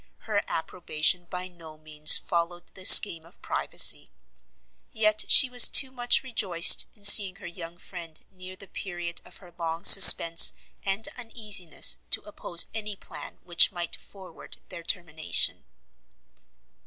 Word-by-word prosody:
Her 210 -2 -5
approbation 175 +1 -4
by 180 +1 -10
no 165 -3 -18
means 155 0 0
followed 175 0 -7
the 185 - -12
scheme 170 -5 +5
of 170 +4 -24
privacy; - - -2 0.8
yet 215 -3 -2
she 270 - +4
was 250 -1 +4
too 265 -1 +3
much 245 0 -1
rejoiced 195 -9 +1
in 210 - -28
seeing 200 -2 +4
her - - -17
young 170 -1 -12
friend 170 -3 -14
near 185 0 -14
the 200 - -15
period 175 -3 -10
of - - -18
her 180 -3 -20
long 165 0 -7
suspence 170 -3 +7 0.3
and 195 +3 -4
uneasiness, 210 -8 -3
to - - +1
oppose 190 -4 -2
any 210 -2 -8
plan - - -13
which 175 -1 +1
might 175 -3 -8
forward 190 -4 -18
their 170 - -11
termination. 160 - -3
180 Hz, 140 wpm, -23 LUFS, 170-205 Hz, 0.8 s, suspence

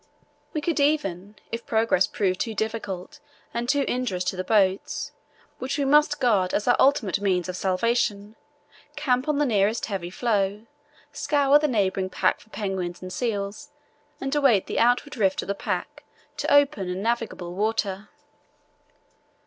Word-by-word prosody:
We 305 - -2
could 320 0 -1
even, 205 - 0 0.2
if 230 0 -5
progress 220 -4 +2
proved 185 -3 -1
too 225 -2 -2
difficult 205 -4 -4 0.3
and 235 +1 -2
too 285 -1 +2
injurious 245 -8 -1
to 185 - -2
the 185 - -3
boats, 195 -1 +1 0.5
which 265 +3 -3
we 285 - 0
must 295 +2 +4
guard 210 -8 +2
as 210 - -1
our 245 - +5
ultimate 235 -9 +3
means 185 -3 +1
of 185 - -4
salvation, 205 +2 0 0.6
camp 265 -2 0
on 300 -1 +1
the 295 - +2
nearest 215 -2 +1
heavy 190 -5 -4
floe, 205 0 -1 0.5
scour 285 0 +3
the 300 - +1
neighbouring 195 -6 0
pack - - +1
for 220 - -20
penguins 190 -5 -4
and 185 0 -6
seals, 215 +2 -3 0.5
and 270 +1 -3
await 270 -10 +3
the - - -2
outward 245 +4 +2
rift 190 -3 +1
of - - -10
the 200 - 0
pack, - - -4 0.3
to - - -1
open 285 -10 +3
and 185 +2 -3
navigable 225 -6 -2
water. 205 0 -1
215 Hz, 155 wpm, -25 LUFS, 190-255 Hz, 0.6 s, our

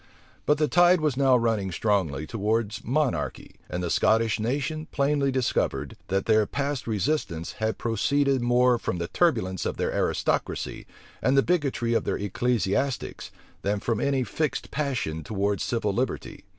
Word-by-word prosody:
But 150 - +4
the 150 0 +2
tide 175 +4 +5
was 150 -4 0
now 135 -2 +4
running 110 -5 0
strongly 80 -5 0
towards 110 +2 -1
monarchy; 140 +3 -1
and 90 0 -3
the 85 - -2
Scottish 110 -1 +2
nation 145 +7 -2
plainly 140 -1 +1
discovered, 75 - -1
that 95 +1 0
their 110 -2 +3
past 140 -2 -2
resistance 105 - -1
had 110 0 -1
proceeded 135 +4 +1
more 120 0 +3
from 90 - -2
the 85 +1 -3
turbulence 110 - +1
of - - -3
their - - -1
aristocracy, - - -1 0.3
and 130 +1 +2
the 135 - +6
bigotry 140 -9 0
of 115 - +2
their - - 0
ecclesiastics, 120 +3 -1 0.3
than 100 +1 0
from 115 0 -1
any 135 -2 +1
fixed 150 +7 -2
passion 125 - -2
towards 100 +3 -1
civil 110 -4 -1
liberty. 125 +5 -3
120 Hz, 150 wpm, -26 LUFS, 100-140 Hz, 0.3 s, the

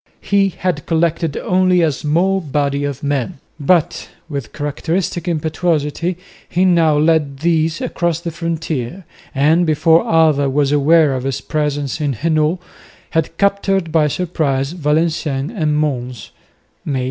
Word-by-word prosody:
He 200 -1 +2
had 180 -5 -3
collected 165 -2 0
only 180 -1 +2
a 160 - +3
small 170 +7 +1
body 145 -2 -1
of 140 -1 -5
men, 140 -5 -2 0.2
but, 165 +3 +1 0.2
with 140 -6 -5
characteristic 160 +5 -3
impetuosity 165 +1 -1 0.3
he 180 +2 +2
now 165 -4 +3
led 150 -3 +1
these 165 -1 +1
across 170 -2 -1
the 170 -1 -5
frontier, 165 -1 -4 0.3
and, 155 +6 +3
before 160 +1 +3
Alva 155 -4 +3
was 140 +1 +1
aware 150 0 +4
of 130 - -2
his 135 0 -2
presence 145 -1 -2
in 145 -2 0
Hainault, 155 - +1 0.5
had 165 0 -1
captured 195 -3 +1
by 155 -2 +3
surprise 145 -4 -1
Valenciennes 155 -3 -1
and 155 -7 0
Mons 125 -6 -3 0.5
(May - - -4
24). 130 - 0
155 Hz, 135 wpm, -17 LUFS, 145-170 Hz, 0.5 s, aware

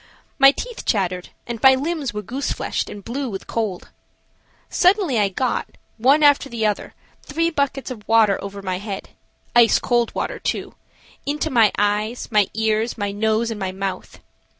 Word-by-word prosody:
My 275 0 +9
teeth 485 - -7
chattered 180 -4 -1 0.2
and 235 -2 -6
my 265 0 +7
limbs 290 -1 -2
were 210 0 -5
goose 265 +7 -3
fleshed - - -2
and 200 -2 -9
blue 265 +2 -3
with 195 -3 -6
cold. 215 -6 -3 0.8
Suddenly 360 - +3
I 200 -1 +2
got, 250 +7 -2 0.2
one 275 +6 +4
after 285 -1 +5
the 230 -3 -2
other, 210 -1 -2 0.3
three 330 +3 -1
buckets 280 -4 -1
of 215 -5 -9
water 220 -3 +4
over 200 0 -7
my 185 -1 -2
head–ice 220 +3 0
cold 240 -1 0
water, - - -3
too–into 295 +3 -5
my 225 -5 +5
eyes, 210 +4 -1
my 210 -3 +4
ears, 220 +1 0
my 205 -1 -2
nose 220 +2 0
and 215 - -5
my 190 -2 -2
mouth. 195 0 -5
225 Hz, 160 wpm, -21 LUFS, 205-275 Hz, 0.8 s, My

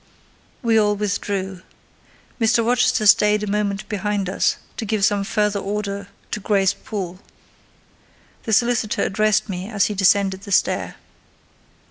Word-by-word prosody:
We 225 -2 +3
all 210 -1 +2
withdrew. 195 -2 -3 0.8
Mr. 230 0 +2
Rochester 245 -2 +2
stayed 210 +1 +5
a - - -3
moment 200 -1 -2
behind 205 -2 -2
us, - - +1 0.2
to - - -3
give 210 -2 +1
some 205 -2 +1
further 210 -1 0
order 200 0 -4 0.2
to - - -2
Grace 200 -1 +2
Poole. 190 -3 -6 1.3
The 220 - -1
solicitor 235 -1 +1
addressed 215 +2 +1
me 190 0 -5
as 205 -3 +1
he 210 - -2
descended 195 -1 +2
the 200 -1 -10
stair. - - +1
205 Hz, 135 wpm, -21 LUFS, 195-215 Hz, 1.3 s, stayed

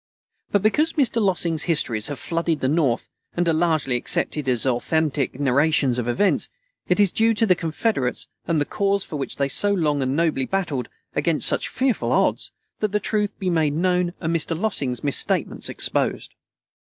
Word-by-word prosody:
But 205 -1 +2
because 300 +10 +2
Mr. 255 -6 +1
Lossing's 175 -5 +1
histories 115 -9 +1
have 145 - -5
flooded 165 -1 -1
the 130 - 0
North, 140 -5 +1 0.3
and 175 0 +1
are 165 - +3
largely 155 -6 +1
accepted 135 +3 -1
as 125 -1 +2
authentic 140 +1 0
narrations 140 -2 +2
of 120 - -3
events, 195 +12 +1 0.4
it 180 - +1
is 200 -3 +4
due 225 0 +2
to 225 - +2
the 190 - +5
Confederates 165 - -1 0.2
and 165 -2 +1
the 145 - +1
cause 200 -1 0
for 155 - -6
which 135 - -4
they 140 - 0
so 205 +9 +1
long 150 -7 +1
and 130 +1 0
nobly 155 -5 +1
battled, 160 -11 -2 0.3
against 165 -3 +1
such - - 0
fearful 260 -3 0
odds, - - +1 0.3
that 210 -2 -1
the 210 - +2
truth 210 0 -1
be 185 -3 -1
made 155 -4 +1
known 180 +1 +1
and 165 0 -1
Mr. 165 0 0
Lossing's 140 - -1
misstatements 140 -2 +1
exposed. - - -1
165 Hz, 180 wpm, -23 LUFS, 140-195 Hz, 0.4 s, the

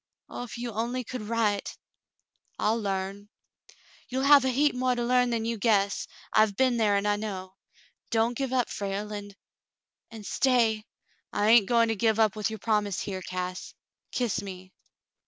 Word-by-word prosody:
Oh, - - -6
if 245 -1 -7
you 240 0 -4
only 235 +4 -2
could 250 +1 -6
write 210 -2 -1 0.4
!" - - -46
"I'll 220 +2 +1
larn." 195 0 -3 0.8
"You'll 260 +1 -1
have 280 -1 +7
a 260 - +1
heap 285 +3 +2
more 250 0 +1
to 240 - -2
learn 250 0 +3
than 230 -2 -1
you 230 -1 -2
guess. 200 -2 +1 0.3
I've 215 -2 +4
been 255 +1 +2
there, 210 -3 +3
and 200 +1 0
I 205 0 +2
know. 190 -3 -5 0.6
Don't 230 +1 +1
give 270 0 -2
up, 255 -2 +1
Frale, 200 +1 -4
and 205 -1 -7 0.4
— - - -62
and 220 -2 -10
stay—" 225 -3 +2 0.5
"I 205 - 0
hain't 225 -3 +6
going 230 -1 +4
to 225 - 0
give 220 +1 +1
up 220 -2 +3
with 215 0 -1
your 220 - -5
promise 205 -2 0
here, 190 -2 -4
Cass; 185 0 -5 0.4
kiss 245 -4 -1
me." 185 -1 -9
220 Hz, 180 wpm, -27 LUFS, 200-240 Hz, 0.8 s, have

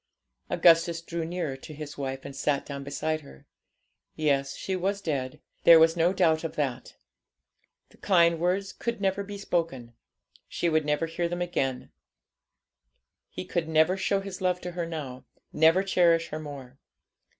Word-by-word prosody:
Augustus 170 -1 +4
drew 170 0 -5
nearer 165 -4 -3
to 150 +3 -11
his 150 -1 -8
wife, 135 -1 -5
and 140 - -8
sat 140 0 0
down 140 -1 -6
beside 155 +3 -2
her. 65 - -15 0.7
Yes, 140 -3 0
she 190 - -3
was 195 +2 -1
dead; 135 -8 -3 0.2
there 170 - +9
was 165 +1 +5
no 170 +1 +3
doubt 165 -4 +2
of 165 - -5
that. 130 -4 -3 0.9
The - - -22
kind 170 -4 +3
words 185 +3 0
could 235 -2 -4
never 195 0 0
be 200 0 -7
spoken, 165 -11 -2 0.5
she 170 - -1
would 155 -2 +1
never 150 +2 0
hear 170 +1 -2
him 175 +1 -3
again, 135 -7 -2 1.4
he 90 - -7
could 170 -2 -2
never 160 +3 +3
show 195 +1 0
his 195 -2 -8
love 180 -1 +1
to 180 - -5
her 175 -1 -3
now, 140 -6 -6 0.3
never 160 +5 +4
cherish 170 -3 +3
her 155 - -5
more. 140 -3 -9
165 Hz, 160 wpm, -27 LUFS, 145-180 Hz, 1.4 s, there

